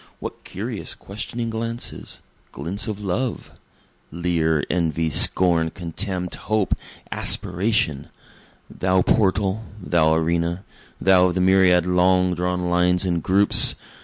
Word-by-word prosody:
What - - -8
curious - - -5
questioning 115 +3 -6
glances 115 +1 -5 0.3
glints 90 +10 -3
of 105 -2 -5
love! 110 +6 -3 0.6
Leer, 80 -3 -1
envy, 80 -2 -1
scorn, 85 -2 +4
contempt, 90 +1 -4
hope, 110 -2 -1 0.4
aspiration! 90 -6 +1 0.6
Thou 95 0 0
portal 100 0 0 0.2
thou 80 -4 +1
arena 85 +2 -1 0.4
thou 95 -1 +4
of 90 - -3
the 90 - 0
myriad 90 -2 +4
long 90 0 +2
drawn 90 0 -2
lines 90 +1 +2
and 85 -2 -1
groups! 100 +4 +5
90 Hz, 110 wpm, -21 LUFS, 85-100 Hz, 0.6 s, groups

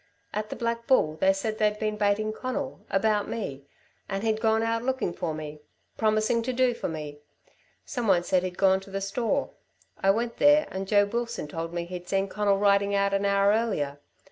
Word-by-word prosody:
At 215 0 -3
the - - -5
Black 230 0 -3
Bull 155 - +3
they 190 - +4
said 215 +3 -3
they'd 210 -1 +2
been 215 0 -1
baiting 210 +1 +1
Conal 260 +3 -4
about 210 +1 +1
me 140 -10 -5 0.4
and 195 +1 -3
he'd 220 -1 0
gone 220 0 +2
out 230 0 0
looking 260 -7 -1
for 165 -4 -3
me 150 -1 -7 0.3
promising 215 +2 +2
to 245 +3 -2
do 255 0 +2
for - - -4
me. 150 -2 -6 0.7
Some 245 -4 -3
one 180 -3 +4
said 180 +1 +2
he'd 180 -1 -5
gone 190 -1 +4
to 195 - -14
the 195 0 -3
store. 225 +7 -1 0.5
I 195 - +3
went 230 +4 +1
there 295 +1 +5
and 190 0 -4
Joe 205 0 +4
Wilson 235 -5 -3
told 165 +2 -5
me 170 0 -3
he'd 175 0 -8
seen 195 0 +1
Conal 205 0 +1
riding 200 0 +3
out 200 0 +2
an 195 0 +1
hour 200 0 +4
earlier. 200 -11 -1
205 Hz, 200 wpm, -27 LUFS, 190-230 Hz, 0.7 s, there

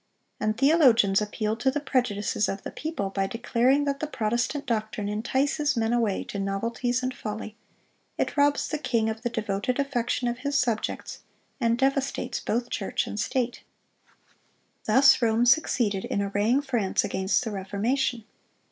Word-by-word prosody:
(410) 215 - 0
And 215 - -2 0.2
theologians 225 -7 +5
appealed 215 +1 -2
to 265 - +2
the 285 +3 -1
prejudices 240 -7 0
of 195 - -4
the - - -6
people 300 -12 -4
by 195 0 -1
declaring 245 +5 +1
that 280 -1 -1
the 305 - -2
Protestant 245 +3 -1
doctrine 215 -3 -2
"entices 265 +6 0
men 225 0 +1
away 225 -5 +1
to 200 - -6
novelties 230 +5 -1
and 255 0 -1
folly; 215 -2 -6 0.6
it - - -1
robs 285 0 +2
the 305 - -3
king 225 -6 0
of 220 0 -7
the 240 - -1
devoted 220 +1 -2
affection 250 -3 -1
of 240 0 -2
his 280 +1 -1
subjects, 235 -5 -2 0.4
and 235 -2 +2
devastates 270 +1 0
both 240 +2 -2
church 195 - -1
and 210 - -5
state." 245 +1 -1 1.2
Thus 265 +5 +6
Rome 230 0 +3
succeeded 235 -7 +2
in - - -2
arraying 210 +7 +1
France 240 -9 0
against 190 +5 0
the 225 - -4
Reformation. 220 +5 -1
235 Hz, 155 wpm, -26 LUFS, 210-265 Hz, 1.2 s, Thus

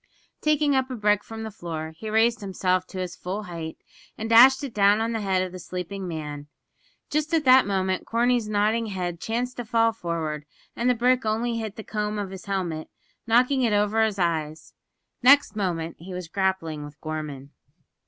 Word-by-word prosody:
Taking 300 -2 +2
up 260 0 +1
a 255 - -4
brick 210 -2 +2
from 225 0 -7
the 220 - -5
floor, 160 -5 -6
he 215 +6 -7
raised 225 +2 +2
himself 185 -2 0
to 190 - -9
his 180 -1 -4
full 195 +4 -4
height, 165 -4 -6 0.4
and 220 - -4
dashed 260 +4 +8
it 270 -5 -5
down 205 +1 +4
on 225 +1 0
the 225 -1 -2
head 190 -2 +1
of 185 - -5
the 185 - -8
sleeping 185 +2 -5
man. 150 -3 -6 0.6
Just 305 +2 0
at 315 -3 +1
that 255 -3 +7
moment 190 -1 -1
Corney's 235 -1 +1
nodding 215 +2 +1
head 180 -4 -4
chanced 245 +3 -2
to 245 - -3
fall 230 0 +2
forward, 160 -6 -4 0.3
and 240 +2 +1
the 250 - +3
brick 250 +2 +2
only 230 +2 0
hit 215 -2 -5
the 220 - -7
comb 210 0 -3
of 200 -2 -4
his 190 -1 -9
helmet, 180 -6 -3 0.4
knocking 250 +4 +3
it 230 -4 +2
over 210 +2 +2
his 215 -2 0
eyes. 160 -3 -2 0.5
Next 280 0 +6
moment 170 -5 -2
he 180 +2 -8
was 180 -2 -6
grappling 170 -5 -1
with 145 0 -11
Gorman. 150 -3 -6
205 Hz, 195 wpm, -25 LUFS, 175-230 Hz, 0.6 s, dashed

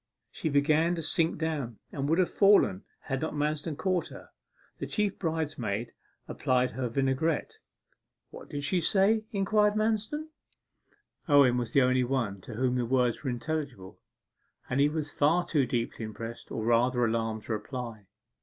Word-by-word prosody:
She 160 - -3
began 155 +4 +3
to 165 - -4
sink 165 +1 +1
down, 150 -8 -3
and 140 +1 -3
would 165 - +3
have 185 -2 +2
fallen 195 - +4 0.2
had 135 0 -3
not 160 - -3
Manston 150 +1 -2
caught 185 +1 0
her. - - -12 0.5
The - - -4
chief 210 -2 -1
bridesmaid 145 - -2 0.3
applied 125 0 +1
her 130 -2 -3
vinaigrette. 135 +5 -1 0.7
'What - - -11
did 145 0 -4
she 175 +5 +1
say?' 210 +5 +3
inquired 210 +1 +2
Manston. 220 +8 -1 1.0
Owen 140 -4 +6
was 120 -2 -3
the 140 - +5
only 130 0 +3
one 120 -7 -1
to 110 - -9
whom 125 +1 +1
the 125 - 0
words 125 0 +1
were 135 - -1
intelligible, 120 -7 -4 0.7
and 125 - -1
he 145 +1 +5
was 150 -1 -2
far 165 +5 +2
too 140 -6 +1
deeply 120 -2 -2
impressed, 115 +2 -7
or 110 - -3
rather 120 +1 +3
alarmed, 110 -1 -1
to 115 - -3
reply. 110 -2 -6
140 Hz, 160 wpm, -29 LUFS, 120-160 Hz, 1.0 s, Owen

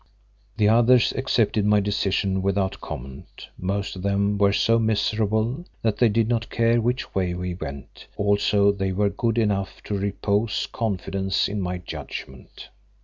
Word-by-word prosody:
The 105 -2 +3
others 120 +2 +5
accepted 115 -5 +1
my 105 0 +4
decision 100 -1 0
without 95 0 -1
comment; 65 +2 -9
most 100 +2 -3
of 90 - -7
them 100 +1 +1
were 100 -1 +4
so 115 +3 +3
miserable 110 +4 0 0.2
that 110 -2 +1
they 120 - +4
did 110 +1 +1
not 115 -1 -1
care 115 0 +2
which 125 +3 -2
way 90 -2 0
we 90 0 -3
went, 70 -6 -9
also 100 0 +3
they 95 -1 -2
were 100 +2 +2
good 115 +3 -1
enough 100 -4 0
to 105 - -3
repose 100 +2 0
confidence 95 -3 -1
in 105 0 -3
my 90 0 -2
judgment. 65 -6 -9
100 Hz, 150 wpm, -24 LUFS, 95-110 Hz, 0.2 s, others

